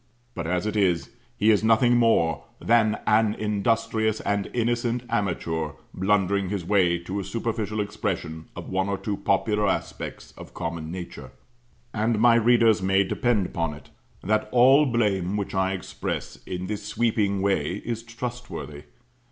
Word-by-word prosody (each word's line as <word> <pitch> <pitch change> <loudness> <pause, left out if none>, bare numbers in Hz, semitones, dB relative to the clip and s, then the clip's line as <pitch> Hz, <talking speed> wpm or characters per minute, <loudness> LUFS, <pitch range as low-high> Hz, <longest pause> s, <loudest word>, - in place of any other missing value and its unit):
But 85 -2 -4
as 90 +2 0
it 105 0 -2
is, 90 -5 +1 0.3
he 110 +2 +4
is 105 0 +2
nothing 115 +2 +4
more 85 - +2
than 110 -2 +3
an 110 0 +3
industrious 110 +1 0
and 100 -1 -1
innocent 120 0 0
amateur 85 -7 -1 0.2
blundering 100 0 +1
his 95 -4 -3
way 90 -3 +3
to 95 +4 -5
a - - -3
superficial 110 +1 -3
expression 80 -5 -3
of - - -7
one 95 +1 -1
or 100 - -1
two 105 +1 -3
popular 105 +2 +1
aspects 95 - -4
of - - -12
common 85 -2 -4
nature. 85 -7 -7 0.6
And 110 +1 +1
my 120 +2 +6
readers 115 -2 +4
may 95 +1 +3
depend 105 +1 +1
upon 85 -4 -2
it, 75 - -16 0.3
that 110 +2 0
all 135 +4 +6
blame 105 -5 0
which 100 - -3
I 95 0 +1
express 95 - -5
in 90 0 -4
this 105 +2 -4
sweeping 105 -2 0
way 90 -5 +1
is 115 -1 -3
trustworthy. 115 - -7
105 Hz, 150 wpm, -25 LUFS, 95-115 Hz, 0.6 s, my